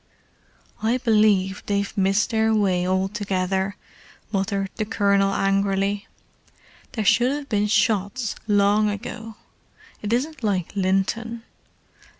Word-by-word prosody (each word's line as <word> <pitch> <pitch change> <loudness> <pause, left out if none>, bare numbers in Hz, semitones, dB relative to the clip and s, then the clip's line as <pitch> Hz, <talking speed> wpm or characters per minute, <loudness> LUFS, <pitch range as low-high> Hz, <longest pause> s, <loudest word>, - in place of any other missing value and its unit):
"I 225 +3 +2
believe 210 -6 +2
they've 200 0 -1
missed 195 +2 +2
their 220 0 +2
way 185 -4 +1
altogether," 190 0 -1 0.6
muttered 195 -1 -1
the 220 - 0
Colonel 200 -2 +2
angrily. 195 +1 0 0.9
"There 220 -4 -2
should 245 +5 +4
hove 285 0 -4
been 210 -1 +1
shots 215 +2 +1
long 205 +1 +3
ago. 215 +2 -6 0.7
It 210 - -4
isn't 270 +4 -1
like 195 -4 -1
Linton. 205 +5 -1
205 Hz, 110 wpm, -23 LUFS, 195-220 Hz, 0.9 s, should